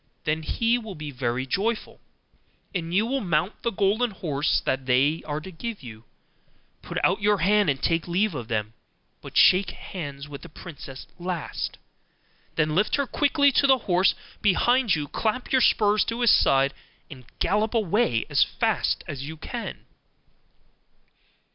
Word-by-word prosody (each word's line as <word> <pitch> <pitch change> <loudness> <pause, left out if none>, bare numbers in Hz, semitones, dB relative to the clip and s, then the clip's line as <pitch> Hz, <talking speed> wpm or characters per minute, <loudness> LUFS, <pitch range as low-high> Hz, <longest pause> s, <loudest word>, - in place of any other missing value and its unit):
Then 155 +1 0
he 230 +9 +1
will 220 -5 -8
be 150 -1 -6
very 125 -1 -2
joyful; 210 - -2 0.7
and 170 -3 -3
you 200 +5 +2
will 270 +3 -1
mount 175 +1 -1
the 235 - 0
golden 210 +4 +1
horse 155 -7 0
that 130 0 -1
they 135 +6 +3
are 150 0 -2
to 185 +5 -10
give 210 - -6
you, 110 -2 -11 0.4
and - - -39
put - - -6
out 200 - +2
your 210 0 +3
hand 205 +2 +3
to 140 - +2
take 165 +5 -1
leave 190 +4 +1
of 120 -6 -5
them; 110 -1 -2 0.5
but - - -7
shake 185 +1 +6
hands 145 -6 -7
with 145 -1 -9
the 170 - -11
princess 145 -5 -10
last. 175 -3 -4 0.8
Then 155 0 +1
lift 205 +6 +2
her 280 - 0
quickly 285 +1 +3
on - - -4
to 280 - +3
the 265 -1 +6
horse 185 +1 +3 0.3
behind 235 +3 +3
you; 150 -2 -3
clap 225 - -2
your 260 - +4
spurs 210 -2 +4
to 230 +1 -3
his 240 - +6
side, 135 +1 +4 0.4
and 130 -3 -11
gallop 210 +6 0
away 205 - +1
as - - +4
fast - - -1
as 140 -1 -5
you 160 +1 -7
can. 235 +9 -6
180 Hz, 165 wpm, -25 LUFS, 145-215 Hz, 0.8 s, shake